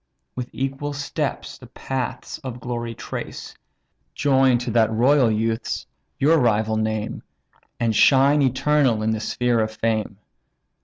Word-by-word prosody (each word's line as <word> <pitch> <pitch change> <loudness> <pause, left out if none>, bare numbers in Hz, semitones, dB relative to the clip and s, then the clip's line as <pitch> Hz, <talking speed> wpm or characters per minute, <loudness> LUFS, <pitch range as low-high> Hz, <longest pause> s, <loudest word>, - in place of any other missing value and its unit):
With 125 0 -5
equal 135 +2 -3
steps 145 0 -4
the - - -13
paths 130 +1 -5
of 130 -5 -7
glory 120 -2 -4
trace; - - -7 0.6
Join 135 -3 +3
to 120 0 -4
that 110 -1 +3
royal 125 +3 +4
youth's 110 +1 -1 0.3
your 160 +4 +4
rival 110 -3 +2
name, 110 -1 -2 0.6
And 115 -2 0
shine 140 +5 +5
eternal 135 -3 +2
in 110 - +1
the 110 - -1
sphere 120 +2 0
of 110 0 +1
fame. 110 -2 -2
120 Hz, 135 wpm, -22 LUFS, 110-135 Hz, 0.6 s, shine